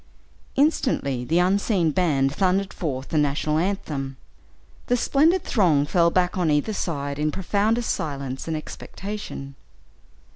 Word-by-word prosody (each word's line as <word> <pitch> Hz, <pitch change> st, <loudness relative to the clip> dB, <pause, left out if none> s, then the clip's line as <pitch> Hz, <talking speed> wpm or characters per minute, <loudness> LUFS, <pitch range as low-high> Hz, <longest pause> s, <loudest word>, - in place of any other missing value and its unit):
Instantly 255 Hz, -, +1 dB
the 160 Hz, +7 st, 0 dB
unseen 185 Hz, -1 st, +2 dB
band 140 Hz, -5 st, +1 dB
thundered 190 Hz, +2 st, +1 dB
forth 135 Hz, -5 st, -4 dB
the 155 Hz, -, +1 dB
national 150 Hz, +1 st, +1 dB
anthem. 150 Hz, -8 st, -3 dB, 0.7 s
The 245 Hz, -, +2 dB
splendid 320 Hz, +9 st, +3 dB
throng 160 Hz, -, +3 dB
fell 170 Hz, +2 st, +3 dB
back 180 Hz, +1 st, +1 dB
on 170 Hz, -3 st, +2 dB
either 150 Hz, +8 st, +1 dB
hand 145 Hz, -7 st, -3 dB
in 155 Hz, 0 st, +1 dB
profoundest 210 Hz, +6 st, 0 dB
silence 140 Hz, -3 st, -4 dB
and 160 Hz, -1 st, -1 dB
expectation. 185 Hz, -3 st, -7 dB
165 Hz, 130 wpm, -24 LUFS, 145-200 Hz, 0.7 s, splendid